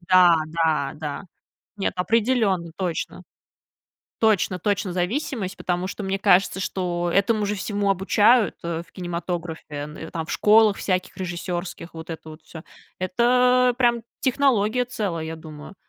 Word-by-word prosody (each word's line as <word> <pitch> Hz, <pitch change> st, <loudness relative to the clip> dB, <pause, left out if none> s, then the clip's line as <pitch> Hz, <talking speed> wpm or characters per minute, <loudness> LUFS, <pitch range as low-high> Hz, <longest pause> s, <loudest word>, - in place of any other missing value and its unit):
Да 180 Hz, -1 st, +6 dB
да 160 Hz, -3 st, 0 dB
да, 150 Hz, +4 st, -5 dB, 0.5 s
нет, 200 Hz, -, -1 dB
определенно, 205 Hz, -4 st, +1 dB
точно 180 Hz, -4 st, -3 dB, 1.0 s
точно 210 Hz, -4 st, +2 dB
точно 200 Hz, 0 st, -1 dB
зависимость, 195 Hz, -, -2 dB
потому 180 Hz, 0 st, -2 dB
что 200 Hz, +2 st, -6 dB
мне 195 Hz, 0 st, -1 dB
кажется, 195 Hz, -1 st, +3 dB
что 175 Hz, -2 st, -2 dB
этому 210 Hz, +2 st, +2 dB
же 205 Hz, +1 st, -1 dB
всему 205 Hz, 0 st, -1 dB
обучают, 210 Hz, +4 st, +3 dB
э, 170 Hz, -1 st, -2 dB
в -, -, -24 dB
кинематографе, 175 Hz, -2 st, -4 dB
н 150 Hz, +1 st, -6 dB
э, 160 Hz, -, -7 dB
там 160 Hz, -1 st, -4 dB
в -, -, -5 dB
школах 215 Hz, -1 st, +5 dB
всяких 185 Hz, -1 st, -1 dB
режиссерских, 175 Hz, -1 st, -5 dB
вот 160 Hz, 0 st, -9 dB
это 160 Hz, -1 st, -7 dB
вот 155 Hz, -, -11 dB
всё. 160 Hz, 0 st, -11 dB, 0.4 s
Это 250 Hz, +6 st, +3 dB
прям 240 Hz, -2 st, +2 dB, 0.2 s
технология 250 Hz, -3 st, +2 dB
целая, 190 Hz, -9 st, -3 dB
я 160 Hz, 0 st, -5 dB
думаю. 155 Hz, +3 st, -11 dB
185 Hz, 145 wpm, -23 LUFS, 170-215 Hz, 1.0 s, Да